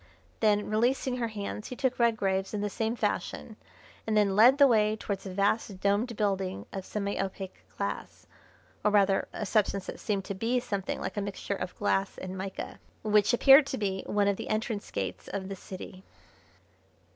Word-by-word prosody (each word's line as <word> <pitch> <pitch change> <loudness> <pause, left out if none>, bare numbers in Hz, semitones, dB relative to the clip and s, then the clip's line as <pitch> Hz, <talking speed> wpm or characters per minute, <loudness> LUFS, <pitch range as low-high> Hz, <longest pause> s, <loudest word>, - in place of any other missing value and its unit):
Then, 210 -1 +3
releasing 245 +4 +1
her 235 -2 -1
hands, 210 0 -5
he 250 - -6
took 255 -1 -1
Redgrave's 200 -4 +1
in 205 - -2
the 205 -1 -2
same 225 +3 -1
fashion, - - -2 0.5
and 215 -1 +2
then 200 -2 +3
led 240 +6 +7
the 285 - +8
way 215 -3 +3
towards 200 -2 -4
a - - -5
vast, 200 0 0
domed 205 +4 +1
building 195 -2 -1
of 190 -1 -5
semi 200 -1 -2
opaque 190 -1 -6 0.2
glass, - - -4 0.6
or - - +4
rather 200 -2 +3
a 210 - -4
substance 200 -2 +1
that - - -7
seemed 200 -4 -2
to - - -3
be 230 +6 0
something 200 -6 -3
like 190 +2 -5
a - - +1
mixture 200 0 -4
of 185 -2 -5
glass 195 -1 0
and 185 0 -6
mica, 190 0 -6 0.2
which 210 -1 +4
appeared 270 +3 +7
to 270 - -3
be 195 -3 -1
one 205 -1 +2
of 200 -1 +1
the - - -6
entrance 215 -1 -2
gates 90 -2 -4
of 190 -1 -4
the 195 - -4
city. 185 0 -9
205 Hz, 185 wpm, -29 LUFS, 195-220 Hz, 0.6 s, the